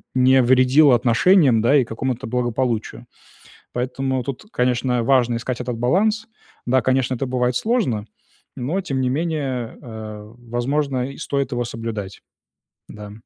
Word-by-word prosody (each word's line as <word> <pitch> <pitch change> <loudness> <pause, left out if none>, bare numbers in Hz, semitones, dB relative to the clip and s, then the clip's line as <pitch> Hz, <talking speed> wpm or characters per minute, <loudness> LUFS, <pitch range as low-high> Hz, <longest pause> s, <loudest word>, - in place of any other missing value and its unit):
не 130 +1 +5
вредило 130 +3 +5
отношениям, 125 - +4
да, 135 +6 +4
и 135 - +4
какому-то 115 +1 -4
благополучию. 120 -1 -2 0.7
Поэтому, 130 +1 -2
тут, 135 - -6
конечно, 125 0 +1
важно 120 -2 +3
искать 125 +1 -4
этот 125 -1 -3
баланс. 210 - +1 0.4
Да, 130 +2 +3
конечно, 130 +1 +1
это 130 +2 -3
бывает 125 -1 0
сложно, 160 - 0 0.5
но 150 +10 -2
тем 140 -8 -3
не 125 - +1
менее, 140 -5 -2
э, 110 -3 -9
возможно, 125 +2 -2
и - - -13
стоит 140 -1 -2
его 120 0 -1
соблюдать. 115 -4 -6 0.7
Да. 105 -1 -9
125 Hz, 135 wpm, -21 LUFS, 120-135 Hz, 0.7 s, не